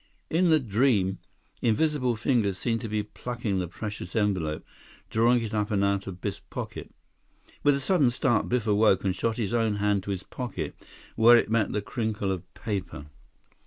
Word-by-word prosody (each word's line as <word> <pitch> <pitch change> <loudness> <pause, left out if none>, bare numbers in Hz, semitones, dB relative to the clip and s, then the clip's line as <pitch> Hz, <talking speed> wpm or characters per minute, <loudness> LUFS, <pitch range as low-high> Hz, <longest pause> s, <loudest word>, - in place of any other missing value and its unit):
In 175 +2 +3
the 160 -1 +5
dream, 105 -5 +1 0.4
invisible 125 +1 +2
fingers 110 -5 +1
seemed 115 +2 -1
to 115 - -5
be 105 0 -1
plucking 110 -2 -3
the 90 - -2
precious 105 -1 -6
envelope, 95 -8 0 0.5
drawing 115 +2 +3
it 110 - -5
up 105 -1 0
and 100 -2 +1
out 100 0 0
of 90 -2 -7
Biff's - - -4
pocket. - - -7 0.7
With 145 -1 +4
a - - -1
sudden 145 -2 +3
start, 120 -2 +1
Biff 120 -3 0
awoke 105 -2 +3
and 95 -2 0
shot 115 -1 -1
his 115 -2 -2
own 115 -3 +2
hand 105 -1 +1
to - - -6
his 95 -2 -3
pocket, 125 -2 -5 0.4
where 120 +2 +7
it 110 - 0
met 115 -3 +2
the 105 - -2
crinkle 110 -4 -2
of 95 -3 -5
paper. 100 -9 -4
110 Hz, 180 wpm, -27 LUFS, 100-120 Hz, 0.7 s, where